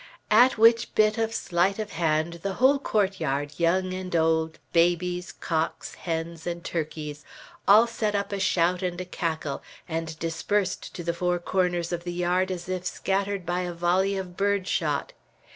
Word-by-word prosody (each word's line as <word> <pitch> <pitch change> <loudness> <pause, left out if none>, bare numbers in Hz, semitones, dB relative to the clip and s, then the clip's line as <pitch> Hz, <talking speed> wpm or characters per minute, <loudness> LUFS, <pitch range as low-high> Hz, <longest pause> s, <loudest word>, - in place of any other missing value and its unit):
At 245 +4 +6
which 230 +1 +4
bit 215 +1 +3
of 225 0 0
sleight 185 -2 +1
of 215 -1 -4
hand 165 +1 0
the 195 +1 -2
whole 265 +6 +4
court 200 -7 0
yard, 145 -1 -2
young 185 +2 +2
and 185 -1 -4
old, 160 0 +2 0.2
babies, 175 +1 +1
cocks, 160 -1 -2
hens, 165 0 -4
and 170 0 -4
turkeys, 155 -2 -4 0.4
all 215 +4 +8
set 220 -3 -2
up 200 +1 -1
a 200 - -2
shout 180 -1 +2
and 180 -1 -2
a 185 - -4
cackle, 160 -5 -3 0.3
and 160 -1 -4
dispersed 180 +4 -2
to 175 - -5
the 170 0 -1
four 180 +1 0
corners 175 -1 0
of 175 -1 -3
the 175 0 -4
yard 180 +2 +1
as 180 -1 -5
if 185 -1 -3
scattered 195 0 -1
by 175 +1 -1
a 180 -1 -3
volley 185 +3 +1
of 180 -2 -6
bird 200 -1 +1
shot. 150 -7 -1
180 Hz, 175 wpm, -26 LUFS, 165-195 Hz, 0.4 s, all